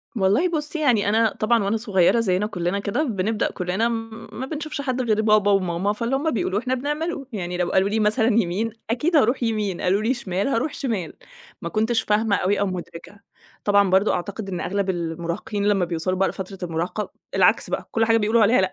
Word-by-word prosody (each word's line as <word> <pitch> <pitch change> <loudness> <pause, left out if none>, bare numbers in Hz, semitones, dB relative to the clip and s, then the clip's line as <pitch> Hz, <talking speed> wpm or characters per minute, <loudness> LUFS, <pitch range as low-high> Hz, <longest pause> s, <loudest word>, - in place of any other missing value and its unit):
والله 210 - +2
بُصِّي، 315 -1 -2
يعني 240 -9 +2
أنا 220 +1 +2
طبعًا، 230 0 +2
وأنا 200 +3 0
صغيِّرة، 210 -1 +3
زينا 200 -2 +1
كلّنا 180 -1 -2
كده، 200 +9 -1
بنبدأ، 215 -4 -1
كلّنا 185 +5 -1 0.4
ما 260 - -5
بنشوفش 305 0 -5
حد 255 -2 -1
غير 215 -3 +1
بابا 215 -1 +4
وماما، 190 0 +1
فاللي 230 +5 -1
هُم 295 +4 0
بيقولوه 205 -3 0
إحنا 255 +3 -2
بنعمله. 295 +3 -3
يعني، 180 -3 -3
لو 175 -1 0
قالوا 190 +1 +3
لي 220 +2 0
مثلًا 220 +2 +2
يمين، 220 -1 +1 0.2
أكيد 300 +9 0
هاروح 255 -2 +3
يمين، 210 -5 -1
قالوا 190 +3 +2
لي 230 +4 +1
شمال، 195 -5 -2
هاروح 275 +3 0
شمال. 210 - -3 0.5
ما 170 - -4
كنتش 220 +4 +1
فاهمة 210 0 +1
أوي 195 +2 +1
أو 200 - +1
مُدرِكة. 185 +2 -7 0.4
طبعًا، 200 -1 +4
برضه، 190 +3 +3
أعتقد 195 +3 -4
إن 180 -2 -3
أغلب 200 0 -1
المراهقين، 170 +3 -3
لمّا 195 -3 +2
بيوصلوا 170 +2 -2
بقى 195 +1 +2
لفترة 190 0 -7
المراهقة، 170 +6 -3 0.2
العكس - - +3
بقى، - - -3
كل 225 0 +2
حاجة 225 0 +4
بيقولوا 225 +1 +2
عليها 220 +1 +4
لأ، 190 0 0
210 Hz, 195 wpm, -23 LUFS, 190-230 Hz, 0.5 s, بابا